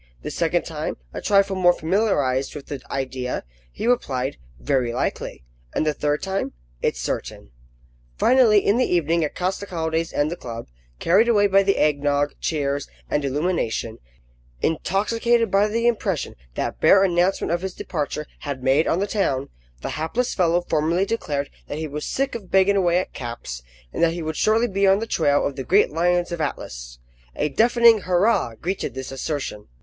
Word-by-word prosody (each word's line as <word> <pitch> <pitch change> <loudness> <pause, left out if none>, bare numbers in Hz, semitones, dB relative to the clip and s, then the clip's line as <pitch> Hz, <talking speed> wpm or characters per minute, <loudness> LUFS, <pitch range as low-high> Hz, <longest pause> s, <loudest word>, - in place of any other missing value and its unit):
The - - -4
second - - 0
time; - - -4 0.2
a - - -5
trifle 200 -1 +3
more 175 -1 +5
familiarised 160 -9 0
with 145 - -7
the 140 -3 -6
idea, 130 -2 -3 0.3
he - - -5
replied, 135 - 0 0.2
"Very 120 - 0
likely;" 120 - -3 0.3
and - - +1
the 155 - +1
third 150 0 -1
time, 195 0 -2 0.3
"It's - - 0
certain." - - -4 0.7
Finally, 230 -6 +5
in 205 - +3
the 255 - +1
evening, 170 -1 +2
at 150 - -3
Costecalde's 165 -3 -2
and 145 +2 0
the - - -2
club, 115 -7 -7 0.3
carried 200 +7 +4
away 205 -3 +4
by 195 0 +5
the 195 0 +1
egg 150 -2 +2
nogg, 145 0 +1
cheers, 140 -3 -1 0.2
and 150 - +1
illumination; 140 -6 -1 0.6
intoxicated 225 +7 +1
by 200 +2 +4
the 230 +2 -1
impression 205 - 0 0.2
that - - -3
bare 195 - +6
announcement 180 -1 +1
of 175 - -1
his 190 -1 -5
departure 150 -2 -3
had 140 -3 -5
made 135 +5 +3
on - - +2
the 195 - +1
town, 140 -11 -1 0.3
the - - -2
hapless 195 +11 -1
fellow 175 -1 +2
formally 165 +3 +1
declared 145 -10 -2 0.2
that 145 - -5
he 160 0 -3
was 150 +1 -5
sick 275 +1 -1
of 205 -6 -7
banging 195 +1 +4
away 175 -3 +3
at 185 - -2
caps, 115 - -6 0.3
and - - -3
that 165 -1 +4
he 170 -1 -4
would 160 0 -3
shortly 225 +2 +3
be 195 -2 +1
on 195 0 +5
the 225 - -3
trail 145 -9 +2
of 140 - -2
the 135 - -4
great 195 +9 +3
lions 175 +2 +1
of 170 - -3
the - - 0
Atlas. - - -5 0.4
A 150 - 0
deafening 235 - +5
hurrah 180 - +2
greeted 185 -3 -3
this 130 0 -6
assertion. 135 -6 -4
170 Hz, 180 wpm, -23 LUFS, 145-195 Hz, 0.7 s, bare